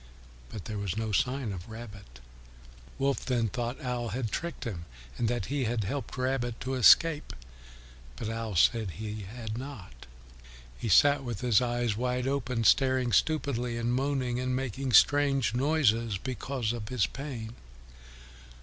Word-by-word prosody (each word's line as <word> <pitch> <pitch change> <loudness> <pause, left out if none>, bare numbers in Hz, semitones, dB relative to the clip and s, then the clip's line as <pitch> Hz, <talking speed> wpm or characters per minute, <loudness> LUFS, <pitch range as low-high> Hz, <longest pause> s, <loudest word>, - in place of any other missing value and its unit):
But 105 -6 -8
there 105 -2 -4
was 100 -1 -3
no 110 -1 -2
sign 125 +2 0
of 90 +2 -7
Rabbit. 105 - -10 0.8
Wolf 135 0 0
then 120 -4 0
thought 120 +4 -3
Owl 125 -2 -2
had 115 0 -3
tricked 170 +7 -4
him, 90 -8 -5 0.3
and 120 - 0
that 120 -3 -1
he 140 -2 -1
had 115 -1 -1
helped 135 +7 -4
Rabbit 125 -2 -1
to 130 +1 -3
escape. 150 +5 +5 0.8
But 110 - -5
Owl 115 -2 -4
said 110 +5 +3
he 105 -2 -6
had 115 -1 -5
not. 100 - -10 0.7
He 115 - -4
sat 140 +9 +5
with 120 -5 -5
his 120 -2 +4
eyes 120 -3 0
wide 125 +2 -1
open, 130 -4 -1
staring 130 0 +3
stupidly 125 -3 +1
and 120 +1 -1
moaning 130 -2 0
and 130 0 -1
making 130 0 -3
strange 135 -1 +4
noises 120 -6 +2
because 125 +1 -3
of 110 -3 -6
his 125 -6 +2
pain. 125 -6 -6
120 Hz, 150 wpm, -29 LUFS, 110-130 Hz, 0.8 s, escape